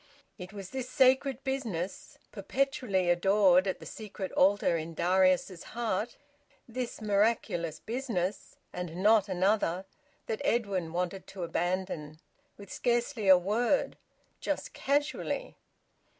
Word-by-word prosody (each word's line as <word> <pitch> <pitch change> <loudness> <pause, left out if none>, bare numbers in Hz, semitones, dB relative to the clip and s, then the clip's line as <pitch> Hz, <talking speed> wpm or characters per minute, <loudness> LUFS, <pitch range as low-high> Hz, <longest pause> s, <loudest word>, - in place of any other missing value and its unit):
It 180 +1 -8
was 195 -3 -8
this 260 -1 -4
sacred 265 0 +3
business 230 - -4
(perpetually 260 -9 0
adored 190 +1 +4
at 190 - -2
the - - -11
secret 205 -3 -6
altar 195 -2 +3
in 165 0 -4
Darius's 185 +1 +2 0.2
heart), 225 -1 -1 0.5
this 245 -1 -5
miraculous 200 -6 +1
business, 225 -6 -3 0.2
and 180 -2 -5
not 210 -1 +5
another, 185 -1 +1 0.4
that 220 - -3
Edwin 195 -8 0
wanted 180 +2 -3
to 190 -2 -7
abandon, 170 -3 -2 0.4
with 200 -2 -10
scarcely 240 -2 0
a 190 -1 +9
word; 220 +9 +1 0.4
just - - -3
casually! 295 - -1
200 Hz, 115 wpm, -30 LUFS, 180-240 Hz, 0.5 s, a